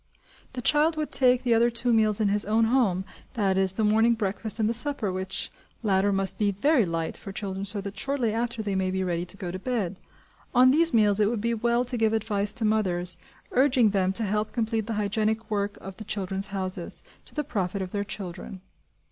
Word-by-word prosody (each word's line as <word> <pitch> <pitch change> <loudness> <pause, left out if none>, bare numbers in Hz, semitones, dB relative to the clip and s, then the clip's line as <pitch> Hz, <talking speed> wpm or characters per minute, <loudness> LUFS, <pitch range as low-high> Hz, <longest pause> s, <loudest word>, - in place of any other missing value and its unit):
The 250 -2 -6
child 310 +4 +3
would 305 -1 -3
take 250 -1 +3
the 245 -2 +2
other 230 +1 +4
two 240 +1 0
meals 215 -2 +3
in 210 -2 +2
his 205 +1 +1
own 220 +2 +1
home, 225 -6 +1 0.3
that 195 -4 +1
is, 190 0 +3
the 220 - -1
morning 225 +2 +3
breakfast 215 +1 -2
and 215 - +2
the 230 - 0
supper, 240 -4 +2
which 185 0 -3 0.3
latter 200 -1 +2
must 195 -1 0
be 210 -1 +2
very 235 +5 +2
light 165 -1 -3
for 195 - -8
children 195 -1 -5
so 200 0 -4
that 200 +1 -7
shortly 265 -6 0
after 235 0 -2
they 205 -2 -2
may 190 -1 0
be 190 0 -1
ready 175 -1 -2
to 195 - -7
go 180 -3 -5
to 185 - -6
bed. 205 -5 -3 0.6
On 255 +1 +6
these 330 +4 +3
meals 210 -3 +5
it 210 -1 +3
would 230 -1 -2
be 235 +2 -1
well 235 +2 0
to 250 0 0
give 220 -1 +2
advice 210 -2 0
to 230 -2 0
mothers, 180 -5 +1 0.4
urging 250 -4 +3
them 190 -2 +1
to 225 - +3
help 210 +1 -2
complete 225 -2 -1
the 230 - -2
hygienic 215 +2 -1
work 205 -1 -2
of 195 -1 -10
the 215 - -8
"Children's 195 -1 -1
Houses," 185 -3 0 0.2
to - - -12
the 300 - -1
profit 200 - -3
of 185 - -7
their 205 -1 -2
children. 190 -1 -7
210 Hz, 220 wpm, -26 LUFS, 195-235 Hz, 0.6 s, On